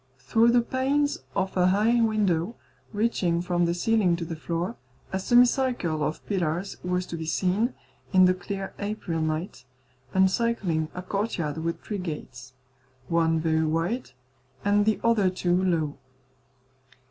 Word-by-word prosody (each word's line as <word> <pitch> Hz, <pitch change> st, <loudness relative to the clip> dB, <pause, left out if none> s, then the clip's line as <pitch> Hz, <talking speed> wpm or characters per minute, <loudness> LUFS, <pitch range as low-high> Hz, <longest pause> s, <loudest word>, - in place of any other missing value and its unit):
Through 225 Hz, -, +3 dB
the 240 Hz, 0 st, +5 dB
panes 275 Hz, +4 st, 0 dB, 0.2 s
of 190 Hz, -1 st, -1 dB
a 180 Hz, -1 st, +4 dB
high 215 Hz, +5 st, +3 dB
window, 210 Hz, -3 st, +1 dB, 0.4 s
reaching 205 Hz, -6 st, +1 dB
from 175 Hz, 0 st, +1 dB
the 170 Hz, 0 st, 0 dB
ceiling 195 Hz, -2 st, +2 dB
to 170 Hz, 0 st, -4 dB
the 165 Hz, -, -5 dB
floor, 170 Hz, +7 st, -3 dB, 0.4 s
a 190 Hz, -, 0 dB
semicircle 240 Hz, -, +3 dB
of 155 Hz, +1 st, -3 dB
pillars 180 Hz, -1 st, -2 dB
was 180 Hz, 0 st, -1 dB
to 170 Hz, -, -6 dB
be 160 Hz, -1 st, -5 dB
seen, 195 Hz, +8 st, +1 dB, 0.4 s
in 185 Hz, 0 st, +6 dB
the 180 Hz, -, +5 dB
clear 195 Hz, +1 st, -5 dB
April 200 Hz, -5 st, -3 dB
night, 155 Hz, -3 st, -3 dB, 0.5 s
encircling 190 Hz, -5 st, +1 dB
a 180 Hz, -, -5 dB
courtyard 185 Hz, -7 st, -2 dB
with 165 Hz, +1 st, -3 dB
three 205 Hz, -2 st, -4 dB
gates, 130 Hz, -7 st, -7 dB, 0.6 s
one 165 Hz, -1 st, +2 dB
very 160 Hz, 0 st, +1 dB
wide, 165 Hz, +10 st, -1 dB, 0.6 s
and 205 Hz, +1 st, +3 dB
the 220 Hz, -, +2 dB
other 225 Hz, -5 st, +3 dB
two 180 Hz, 0 st, 0 dB
low. 160 Hz, -6 st, 0 dB
185 Hz, 145 wpm, -26 LUFS, 165-215 Hz, 0.6 s, in